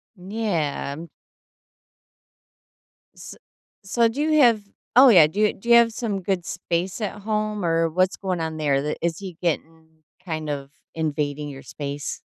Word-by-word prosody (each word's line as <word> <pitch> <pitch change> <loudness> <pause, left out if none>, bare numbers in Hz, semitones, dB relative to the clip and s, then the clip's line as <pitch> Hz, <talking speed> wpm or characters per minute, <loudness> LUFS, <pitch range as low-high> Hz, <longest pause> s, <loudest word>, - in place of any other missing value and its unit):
Yeah. 175 -7 -3 2.1
S - - -10 0.5
so 230 +4 +2
do 240 +6 -3
you 310 0 +3
have 230 -5 +5 0.3
oh, 260 +2 +9
yeah, 175 -9 +8
do 160 +7 -6
you 215 -1 +3
do 235 - -9
you 235 - +8
have 235 -1 +6
some 210 -5 -3
good 180 -2 -2
space 175 +4 -3
at 210 0 -4
home, 215 -1 -2
or 165 0 +2
what's 185 +3 +1
going 185 -3 -2
on 160 -1 -3
there? 140 -3 +1
The 150 +1 -2
is 170 -1 -1
he 185 -4 -8
getting 160 -2 -4 0.2
kind 155 -4 -4
of 140 -1 -4 0.3
invading 150 -2 -2
your 135 -1 -10
space? 145 -1 -5
175 Hz, 155 wpm, -23 LUFS, 155-210 Hz, 2.1 s, oh